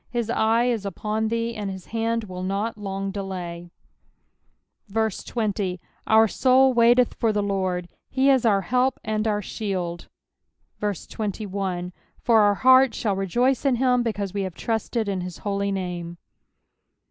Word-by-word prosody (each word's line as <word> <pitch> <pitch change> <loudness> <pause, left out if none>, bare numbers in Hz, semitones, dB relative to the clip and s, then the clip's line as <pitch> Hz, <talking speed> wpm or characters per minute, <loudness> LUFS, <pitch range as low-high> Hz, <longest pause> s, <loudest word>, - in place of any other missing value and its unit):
His 235 -2 -2
eye 225 0 +2
is 235 -4 0
upon 210 +3 -2
thee, 230 +1 -1
and 205 -2 -4
his 190 -1 -8
liaSd 230 0 -1
will 180 -1 -6
not 200 +4 -2
long 195 -1 -4
delay. 180 -3 -6 1.2
20 210 -3 -1 0.3
Our 220 0 +6
soul 260 +3 +4
waiteth 240 +1 +4
for 225 - +1
the 210 -1 0
LoRD: 185 -3 -1 0.2
he 270 +1 +3
is 265 -3 +3
our 205 -4 +3
help 250 +7 +1
and 215 0 -1
our 210 -1 0
shield. 180 -5 -4 0.7
21 195 -2 -3 0.3
For 230 -2 +4
our 205 -1 +4
heart 260 +1 +5
shall 205 -4 0
rejoice 240 +7 +1
in 275 -3 +3
him, 250 0 +2
because 205 -5 -2
we 200 - -1
have 185 -3 -4
trusted 225 0 -2
in 195 -2 -1
his 180 -1 -6
holy 200 -1 -2
name. 175 -3 -4
210 Hz, 145 wpm, -24 LUFS, 190-230 Hz, 1.2 s, Our